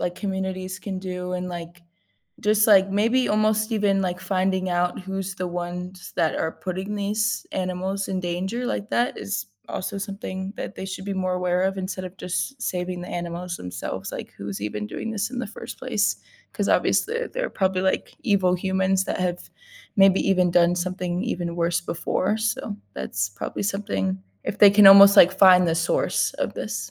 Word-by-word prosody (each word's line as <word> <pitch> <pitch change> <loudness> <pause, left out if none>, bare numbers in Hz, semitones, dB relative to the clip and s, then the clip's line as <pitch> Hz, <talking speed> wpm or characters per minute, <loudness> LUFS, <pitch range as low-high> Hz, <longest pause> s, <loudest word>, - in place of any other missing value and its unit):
like, 175 0 -2
communities 190 -1 -4
can 190 -2 -4
do 180 -1 -4
and, 180 0 -3
like, 175 0 -8 0.6
just, 215 +1 +3
like, 195 -2 +6
maybe 230 +5 +2
almost 215 +1 +2
even, 200 -3 +2
like, 180 -1 -2
finding 185 0 0
out 175 0 0
who's 190 0 -5
the 180 -1 -3
ones 180 +1 -6
that 160 - +2
are 160 - -1
putting 190 +4 -5
these 210 +2 -1
animals 190 +1 -2
in 190 - -1
danger, 185 +7 -3
like, 210 -2 -3
that 240 +1 +1
is 100 -1 -4 0.2
also 200 +2 -4
something 195 -1 -5
that - - -6
they - - -6
should 190 0 -6
be 200 - -3
more 185 -1 -1
aware 180 0 0
of 190 +1 0
instead 185 0 -4
of 180 - -8
just 215 +9 -3
saving 180 -3 -3
the 180 - -8
animals 175 0 -4
themselves, 90 0 -6
like, - - -7
who's 100 0 -6
even 105 0 -3
doing 225 - -5
this 215 +2 -2
in 250 - -5
the 250 - -2
first 205 - -9
place, - - 0 0.4
'cause - - -1
obviously 475 +1 +1
they're - - -3
probably, 190 -1 0
like, 190 0 0
evil 195 -6 +3
humans 190 +1 +1
that - - -3
have 180 -1 -2 0.5
maybe 195 -1 +6
even 180 -2 +3
done 175 0 +4
something 180 0 -2
even 175 -8 -3
worse 170 0 +1
before, 180 +4 -1
so, 220 - -2 0.2
that's 95 +10 -2
probably 100 - -5
something 100 - -2 0.2
if 205 - -4
they 205 - +9
can 200 0 +8
almost, 200 +1 +9
like, 185 +2 +7
find 180 -2 +7
the 165 - +2
source 170 0 +1
of - - -2
this. - - -4
185 Hz, 185 wpm, -24 LUFS, 175-200 Hz, 0.6 s, they